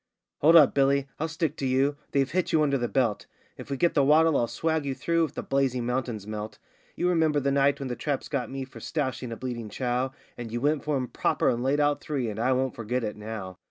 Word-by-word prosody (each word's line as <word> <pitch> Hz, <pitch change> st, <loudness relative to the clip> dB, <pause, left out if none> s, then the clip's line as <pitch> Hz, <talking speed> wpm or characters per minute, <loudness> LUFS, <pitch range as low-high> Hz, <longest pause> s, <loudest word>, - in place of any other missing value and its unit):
'Hold 160 Hz, +3 st, +6 dB
up, 155 Hz, -4 st, +8 dB
Billy; 140 Hz, 0 st, +2 dB
I'll 160 Hz, -, 0 dB
stick 160 Hz, -1 st, -2 dB
to 135 Hz, -, -3 dB
you; 135 Hz, +3 st, +2 dB, 0.2 s
they've 135 Hz, -1 st, +1 dB
hit 185 Hz, +2 st, 0 dB
you 155 Hz, -1 st, +4 dB
under 140 Hz, -2 st, +1 dB
the 120 Hz, -, 0 dB
belt; 120 Hz, -6 st, 0 dB, 0.3 s
If -, -, -10 dB
we 140 Hz, -, -2 dB
get 170 Hz, +5 st, +2 dB
the 145 Hz, -, +3 dB
waddle 155 Hz, +2 st, +5 dB
I'll 120 Hz, -, +2 dB
swag 160 Hz, +4 st, -1 dB
you 135 Hz, -1 st, -3 dB
through, 165 Hz, +2 st, +1 dB
if 150 Hz, -, -10 dB
the -, -, -4 dB
blazing 135 Hz, -3 st, 0 dB
mountains 125 Hz, -4 st, -2 dB
melt; 105 Hz, 0 st, -6 dB, 0.4 s
You 175 Hz, -, 0 dB
remember 160 Hz, -4 st, +2 dB
the 140 Hz, 0 st, 0 dB
night 140 Hz, 0 st, +3 dB
when 135 Hz, -, -4 dB
the 125 Hz, -, -3 dB
traps 145 Hz, 0 st, -3 dB
got 130 Hz, -6 st, -2 dB
me 135 Hz, 0 st, -5 dB
for 135 Hz, -, -13 dB
stoushing 130 Hz, -5 st, -3 dB
a 115 Hz, -, -5 dB
bleeding 120 Hz, -4 st, -5 dB
Chow, 125 Hz, +3 st, -1 dB, 0.3 s
And 115 Hz, -2 st, -6 dB
you 120 Hz, -, -2 dB
went 145 Hz, +3 st, +1 dB
for 150 Hz, -1 st, 0 dB
'em 130 Hz, -2 st, -1 dB
proper -, -, +1 dB
and 120 Hz, -, 0 dB
laid 135 Hz, +3 st, +1 dB
out 145 Hz, 0 st, +2 dB
three, 130 Hz, -7 st, -2 dB
and 105 Hz, -, -7 dB
I 125 Hz, +3 st, +2 dB
won't 130 Hz, 0 st, +1 dB
forget 120 Hz, +2 st, -3 dB
it 105 Hz, -1 st, -3 dB
now. 105 Hz, -3 st, -7 dB
135 Hz, 250 wpm, -27 LUFS, 120-145 Hz, 0.4 s, up